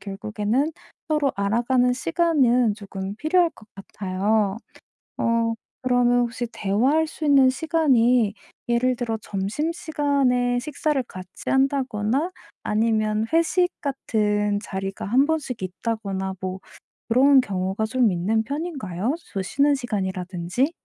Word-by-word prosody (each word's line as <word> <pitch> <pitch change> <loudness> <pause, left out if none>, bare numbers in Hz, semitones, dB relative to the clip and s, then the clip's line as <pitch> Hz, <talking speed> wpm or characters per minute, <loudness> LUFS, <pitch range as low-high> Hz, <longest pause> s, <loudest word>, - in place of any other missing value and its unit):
결국에는 210 +7 -1 0.4
서로 300 -3 +1
알아가는 240 +5 +2
시간은 255 - +2
조금 195 -2 -6
필요할 335 +5 +2
것 215 - -18
같아요. 195 +1 -1 0.6
어 230 0 +1 0.3
그러면 245 -1 +3
혹시 240 0 -2
대화할 255 +12 +1
수 315 - -9
있는 275 -3 +6
시간이 255 -7 +2 0.3
예를 245 +2 +2
들어 230 -2 -2
점심시간에 255 - 0
식사를 295 +1 -1
같이 185 -4 -9
한다거나 270 - +1 0.3
아니면 215 0 +1
회식 335 +2 +3
같은 210 -7 0
자리가 195 0 -5
1 255 +7 +3
번씩 295 -7 -2
있다거나 190 0 -3
뭐 185 0 -4 0.5
그런 265 +3 +6
경우가 195 -1 -2
좀 245 -1 +2
있는 200 +6 0
편인가요? 265 - -3 0.2
저 195 - -1
쉬는 280 +9 +2
시간이라든지? 190 - -2
235 Hz, 270 characters per minute, -23 LUFS, 205-275 Hz, 0.6 s, 있는